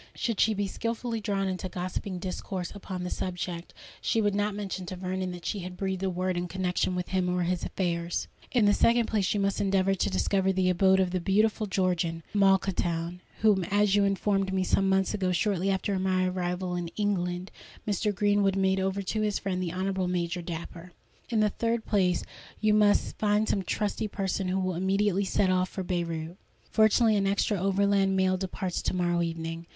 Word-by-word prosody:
Should 230 Hz, -5 st, -2 dB
she 220 Hz, -1 st, +3 dB
be 200 Hz, 0 st, 0 dB
skilfully 230 Hz, +2 st, -3 dB
drawn 200 Hz, -1 st, -1 dB
into 185 Hz, 0 st, -3 dB
gossiping 185 Hz, +1 st, -4 dB
discourse 180 Hz, 0 st, -4 dB
upon 190 Hz, -3 st, -6 dB
the 180 Hz, -, -4 dB
subject, 175 Hz, -1 st, -4 dB, 0.3 s
she 225 Hz, -, +1 dB
would 205 Hz, -2 st, +2 dB
not 205 Hz, 0 st, 0 dB
mention 195 Hz, -3 st, -4 dB
to 185 Hz, -, -5 dB
Vernon 185 Hz, 0 st, -3 dB
that 175 Hz, -1 st, -9 dB
she 205 Hz, -, -2 dB
had 180 Hz, 0 st, -7 dB
breathed 190 Hz, -1 st, -2 dB
a 190 Hz, -, 0 dB
word 185 Hz, 0 st, -1 dB
in 175 Hz, 0 st, -2 dB
connexion 180 Hz, 0 st, -1 dB
with 180 Hz, 0 st, -3 dB
him 185 Hz, -1 st, 0 dB
or 180 Hz, 0 st, 0 dB
his 180 Hz, 0 st, -1 dB
affairs. 170 Hz, -2 st, -2 dB, 0.2 s
"In 240 Hz, -5 st, +3 dB
the 205 Hz, -, +5 dB
second 235 Hz, +2 st, +4 dB
place, 210 Hz, -4 st, 0 dB
you -, -, +1 dB
must 200 Hz, 0 st, 0 dB
endeavour 195 Hz, -1 st, +2 dB
to 195 Hz, -, 0 dB
discover 190 Hz, -, +1 dB
the 185 Hz, -1 st, +2 dB
abode 190 Hz, +1 st, +4 dB
of 185 Hz, -1 st, +1 dB
the 185 Hz, -, 0 dB
beautiful 210 Hz, +4 st, +1 dB
Georgian, 180 Hz, -3 st, 0 dB
Malkhatoun, 180 Hz, -3 st, +1 dB, 0.2 s
whom, 210 Hz, -4 st, +4 dB
as 205 Hz, +1 st, +2 dB
you 205 Hz, 0 st, +4 dB
informed 195 Hz, 0 st, +1 dB
me 190 Hz, -1 st, +1 dB
some 195 Hz, +1 st, +2 dB
months 190 Hz, +1 st, +2 dB
ago—shortly 190 Hz, 0 st, 0 dB
after 195 Hz, 0 st, 0 dB
my 185 Hz, -1 st, +1 dB
arrival 180 Hz, 0 st, -2 dB
in 175 Hz, -1 st, -3 dB
England—Mr. 200 Hz, +1 st, -2 dB
Greenwood 205 Hz, -1 st, +2 dB
made 190 Hz, 0 st, +2 dB
over 190 Hz, +1 st, -1 dB
to 215 Hz, +3 st, -2 dB
his 210 Hz, -1 st, +1 dB
friend 185 Hz, -2 st, -2 dB
the 175 Hz, -2 st, -2 dB
Honourable 190 Hz, 0 st, -1 dB
Major 175 Hz, 0 st, -1 dB
Dapper. 170 Hz, +1 st, -7 dB, 0.4 s
"In 225 Hz, -2 st, +2 dB
the 210 Hz, -, +4 dB
third 230 Hz, +2 st, -1 dB
place 185 Hz, -4 st, +2 dB, 0.4 s
you 215 Hz, -1 st, +3 dB
must 210 Hz, -1 st, +3 dB
find 210 Hz, 0 st, +2 dB
some 195 Hz, -, +1 dB
trusty 210 Hz, +3 st, -2 dB
person 195 Hz, -1 st, -2 dB
who 185 Hz, +1 st, 0 dB
will 185 Hz, -1 st, -1 dB
immediately 195 Hz, +2 st, +1 dB
set 190 Hz, 0 st, +2 dB
off 185 Hz, 0 st, +1 dB
for 190 Hz, -, -5 dB
Beyrout. 170 Hz, -1 st, -3 dB, 0.3 s
Fortunately, 220 Hz, 0 st, +4 dB
an 195 Hz, -1 st, +1 dB
extra 200 Hz, 0 st, +1 dB
Overland 195 Hz, 0 st, +2 dB
Mail 185 Hz, 0 st, +3 dB
departs 185 Hz, -1 st, -3 dB
to -, -, -1 dB
morrow 175 Hz, -1 st, +1 dB
evening. 165 Hz, 0 st, -4 dB
190 Hz, 190 wpm, -28 LUFS, 180-200 Hz, 0.4 s, the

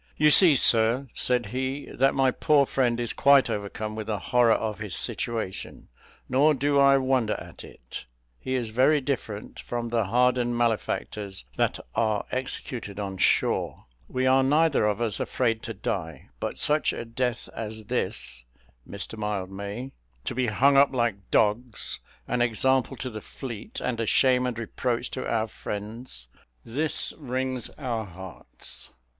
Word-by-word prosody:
"You 150 Hz, 0 st, +5 dB
see, 165 Hz, -2 st, +8 dB
sir," 115 Hz, +2 st, +4 dB
said 125 Hz, -1 st, +2 dB
he, 130 Hz, +2 st, -2 dB
"that 135 Hz, +2 st, +2 dB
my 135 Hz, -1 st, +3 dB
poor 145 Hz, +2 st, +3 dB
friend 120 Hz, -3 st, +1 dB
is 120 Hz, -1 st, -1 dB
quite 140 Hz, -3 st, +5 dB
overcome 105 Hz, +1 st, -4 dB
with 110 Hz, -1 st, -5 dB
the 110 Hz, -2 st, -1 dB
horror 115 Hz, +5 st, +3 dB
of 110 Hz, -1 st, -2 dB
his 105 Hz, -5 st, -2 dB
situation: 115 Hz, -5 st, -2 dB, 0.4 s
nor 145 Hz, +4 st, +4 dB
do 140 Hz, +1 st, +2 dB
I 140 Hz, 0 st, +6 dB
wonder 130 Hz, -4 st, +1 dB
at -, -, -10 dB
it. -, -, -10 dB, 0.3 s
He 130 Hz, -, -2 dB
is 120 Hz, -4 st, -2 dB
very 130 Hz, +6 st, +4 dB
different 125 Hz, -6 st, -4 dB
from 120 Hz, -1 st, -4 dB
the 115 Hz, -2 st, +1 dB
hardened 120 Hz, +2 st, +2 dB
malefactors 105 Hz, -, -2 dB
that -, -, +1 dB, 0.2 s
are 110 Hz, -2 st, +1 dB
executed 125 Hz, -5 st, -4 dB
on 95 Hz, -2 st, -4 dB
shore: -, -, +1 dB, 0.2 s
we 130 Hz, 0 st, -1 dB
are 130 Hz, +1 st, +5 dB
neither 145 Hz, -3 st, +3 dB
of 105 Hz, +2 st, -1 dB
us 110 Hz, -4 st, 0 dB
afraid 115 Hz, -3 st, 0 dB
to 115 Hz, -, -5 dB
die; 80 Hz, -4 st, -4 dB
but -, -, -3 dB
such 150 Hz, +1 st, +2 dB
a -, -, -5 dB
death 120 Hz, +1 st, -2 dB
as 110 Hz, -1 st, -5 dB
this, 60 Hz, -9 st, -2 dB, 0.4 s
Mr 100 Hz, +2 st, -5 dB
Mildmay 100 Hz, +4 st, -4 dB, 0.3 s
to -, -, -2 dB
be 125 Hz, 0 st, 0 dB
hung 135 Hz, +6 st, +4 dB
up 140 Hz, 0 st, +6 dB
like 115 Hz, -7 st, -1 dB
dogs, 115 Hz, +2 st, +1 dB, 0.3 s
an 125 Hz, 0 st, 0 dB
example 125 Hz, +2 st, +1 dB
to 130 Hz, -, -4 dB
the 110 Hz, -1 st, -7 dB
fleet, 135 Hz, -, -7 dB
and 125 Hz, -2 st, -2 dB
a 115 Hz, -, -1 dB
shame 125 Hz, +1 st, +3 dB
and 120 Hz, -2 st, -3 dB
reproach 120 Hz, +1 st, -2 dB
to -, -, -4 dB
our 115 Hz, -1 st, +1 dB
friends 105 Hz, -, -7 dB, 0.4 s
this 145 Hz, +7 st, -2 dB
wrings 130 Hz, -3 st, -3 dB
our 120 Hz, -6 st, -3 dB
hearts! 95 Hz, -1 st, -8 dB
120 Hz, 155 wpm, -26 LUFS, 105-130 Hz, 0.4 s, see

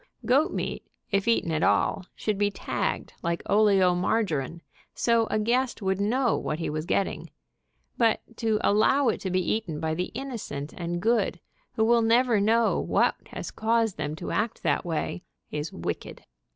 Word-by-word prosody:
Goat 275 Hz, +6 st, +3 dB
meat, -, -, -3 dB, 0.3 s
if 200 Hz, +1 st, +1 dB
eaten 230 Hz, -7 st, +2 dB
at 155 Hz, -1 st, 0 dB
all, 185 Hz, -, +2 dB
should 210 Hz, -2 st, -2 dB
be 205 Hz, 0 st, +3 dB
tagged, 200 Hz, -, -3 dB
like 170 Hz, 0 st, -2 dB
oleomargarine, 185 Hz, -, +2 dB, 0.3 s
so 230 Hz, -1 st, +2 dB
a -, -, 0 dB
guest 240 Hz, +4 st, +1 dB
would 190 Hz, -1 st, -1 dB
know 245 Hz, +4 st, +2 dB
what 150 Hz, -, -3 dB
he 165 Hz, -, -3 dB
was 155 Hz, +2 st, -4 dB
getting, 195 Hz, -, -1 dB, 0.7 s
but 230 Hz, -2 st, +4 dB, 0.2 s
to 220 Hz, -2 st, +1 dB
allow 240 Hz, +6 st, +4 dB
it -, -, -2 dB
to 190 Hz, -, -2 dB
be 185 Hz, -1 st, 0 dB
eaten 190 Hz, -9 st, -3 dB
by 160 Hz, 0 st, -1 dB
the 180 Hz, +3 st, -2 dB
innocent 230 Hz, -, -5 dB
and 175 Hz, 0 st, -4 dB
good, 220 Hz, -6 st, +1 dB, 0.3 s
who 220 Hz, -, +2 dB
will 235 Hz, +1 st, +4 dB
never 230 Hz, -1 st, +3 dB
know 225 Hz, +2 st, +3 dB
what -, -, +2 dB
has -, -, -6 dB
caused 225 Hz, -2 st, +1 dB
them 150 Hz, +1 st, -3 dB
to -, -, -6 dB
act 220 Hz, +1 st, -1 dB
that 145 Hz, -4 st, +1 dB
way, 170 Hz, +1 st, -3 dB, 0.3 s
is 150 Hz, +1 st, -3 dB
wicked. 85 Hz, -, -5 dB
205 Hz, 165 wpm, -27 LUFS, 170-230 Hz, 0.7 s, but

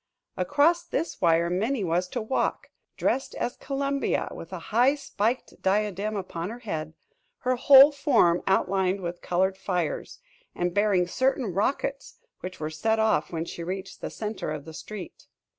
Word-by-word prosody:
Across 305 Hz, -, +2 dB
this 330 Hz, -, -3 dB
wire 170 Hz, 0 st, +3 dB
Minnie 215 Hz, +6 st, 0 dB
was 175 Hz, +1 st, 0 dB
to 235 Hz, +4 st, -4 dB
walk, 240 Hz, +5 st, -1 dB, 0.3 s
dressed 270 Hz, -, 0 dB
as 240 Hz, -, -2 dB
Columbia, 275 Hz, 0 st, -1 dB
with -, -, -9 dB
a -, -, -4 dB, 0.2 s
high 250 Hz, +5 st, +5 dB
spiked 240 Hz, -4 st, -2 dB
diadem 205 Hz, +1 st, 0 dB
upon 180 Hz, -2 st, -4 dB
her 230 Hz, -, -6 dB
head, 160 Hz, -9 st, -5 dB, 0.5 s
her 255 Hz, 0 st, +1 dB
whole 275 Hz, +3 st, +8 dB
form 235 Hz, -, +3 dB
outlined 190 Hz, 0 st, +1 dB
with 175 Hz, 0 st, -5 dB
colored 190 Hz, +2 st, 0 dB
fires, 180 Hz, -4 st, -2 dB, 0.4 s
and 175 Hz, 0 st, -1 dB
bearing 200 Hz, -3 st, +3 dB
certain 255 Hz, 0 st, 0 dB
rockets 275 Hz, +7 st, -2 dB, 0.2 s
which 185 Hz, 0 st, -7 dB
were 155 Hz, 0 st, -3 dB
set 220 Hz, +8 st, 0 dB
off 220 Hz, 0 st, +2 dB
when 165 Hz, -1 st, -3 dB
she 170 Hz, -, -7 dB
reached 190 Hz, +2 st, -6 dB
the -, -, -4 dB
center 215 Hz, -5 st, -4 dB
of 150 Hz, -2 st, -5 dB
the 160 Hz, -, -9 dB
street. 195 Hz, +2 st, -9 dB
200 Hz, 160 wpm, -26 LUFS, 180-250 Hz, 0.5 s, whole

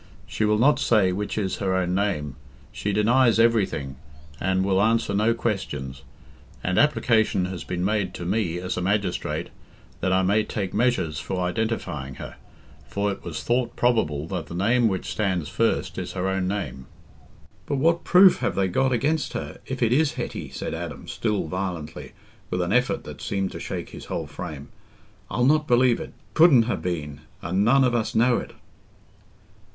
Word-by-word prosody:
She 110 Hz, -, -1 dB
will 105 Hz, 0 st, +3 dB
not 140 Hz, +6 st, +4 dB
say 105 Hz, -5 st, +3 dB
which 105 Hz, +4 st, -3 dB
is 95 Hz, -3 st, -1 dB
her 95 Hz, -2 st, 0 dB
own 90 Hz, -1 st, 0 dB
name—she 75 Hz, -3 st, -3 dB
denies 115 Hz, +3 st, +4 dB
everything, 100 Hz, -, +1 dB, 0.4 s
and 95 Hz, +1 st, +1 dB
will 95 Hz, 0 st, +2 dB
answer 115 Hz, -1 st, +2 dB
no 110 Hz, +3 st, +2 dB
questions, 70 Hz, -, -3 dB, 0.6 s
and 95 Hz, 0 st, +1 dB
application 115 Hz, -10 st, +3 dB
has 95 Hz, -2 st, -5 dB
been 90 Hz, 0 st, -3 dB
made 100 Hz, -3 st, 0 dB
to 85 Hz, -, -6 dB
me, 90 Hz, -3 st, 0 dB
as 90 Hz, +1 st, -3 dB
a -, -, -1 dB
magistrate, 100 Hz, 0 st, -1 dB, 0.5 s
that 95 Hz, -, 0 dB
I 95 Hz, 0 st, +3 dB
may 100 Hz, +3 st, +3 dB
take 100 Hz, -3 st, -4 dB
measures 105 Hz, -10 st, +1 dB
for 95 Hz, 0 st, -3 dB
identifying 85 Hz, -, -3 dB
her, -, -, -9 dB, 0.5 s
for 100 Hz, 0 st, -1 dB
it 100 Hz, -, -7 dB
was 85 Hz, -3 st, -5 dB
thought 120 Hz, 0 st, 0 dB
probable 80 Hz, -12 st, +1 dB
that 90 Hz, -6 st, -4 dB
the 85 Hz, -, -7 dB
name 115 Hz, +6 st, +3 dB
which 95 Hz, -3 st, -2 dB
stands 95 Hz, -7 st, -1 dB
first -, -, 0 dB
is -, -, -5 dB
her 95 Hz, 0 st, -2 dB
own 95 Hz, -1 st, 0 dB
name." 95 Hz, -10 st, -4 dB, 0.8 s
"But 145 Hz, -, -1 dB
what 165 Hz, +5 st, +2 dB
proof 185 Hz, +1 st, +6 dB
have 120 Hz, -, -1 dB
they 95 Hz, -1 st, +1 dB
got 130 Hz, +8 st, +1 dB
against 145 Hz, +6 st, 0 dB
her, -, -, -5 dB
if 130 Hz, -2 st, -2 dB
it 115 Hz, +1 st, +3 dB
is 150 Hz, +2 st, +2 dB
Hetty?" -, -, -5 dB
said -, -, -5 dB
Adam, -, -, -6 dB
still 105 Hz, -3 st, -1 dB
violently, 90 Hz, -2 st, -5 dB, 0.4 s
with 90 Hz, 0 st, 0 dB
an 85 Hz, -, -1 dB
effort 125 Hz, +7 st, +1 dB
that -, -, -10 dB
seemed 95 Hz, -1 st, -2 dB
to -, -, -7 dB
shake -, -, -5 dB
his -, -, -10 dB
whole 80 Hz, -, -3 dB
frame. 75 Hz, -1 st, -8 dB, 0.6 s
"I'll 125 Hz, -, +1 dB
not 150 Hz, +2 st, +3 dB
believe 120 Hz, 0 st, +4 dB
it. -, -, -4 dB
It -, -, -18 dB, 0.2 s
couldn't 155 Hz, -8 st, +7 dB
ha' 120 Hz, -, -2 dB
been, 75 Hz, -5 st, -4 dB, 0.2 s
and 95 Hz, +5 st, +1 dB
none 135 Hz, +5 st, +5 dB
of 125 Hz, -2 st, +2 dB
us 115 Hz, -2 st, -1 dB
know 120 Hz, +2 st, +4 dB
it." -, -, -6 dB
100 Hz, 180 wpm, -24 LUFS, 90-120 Hz, 0.8 s, couldn't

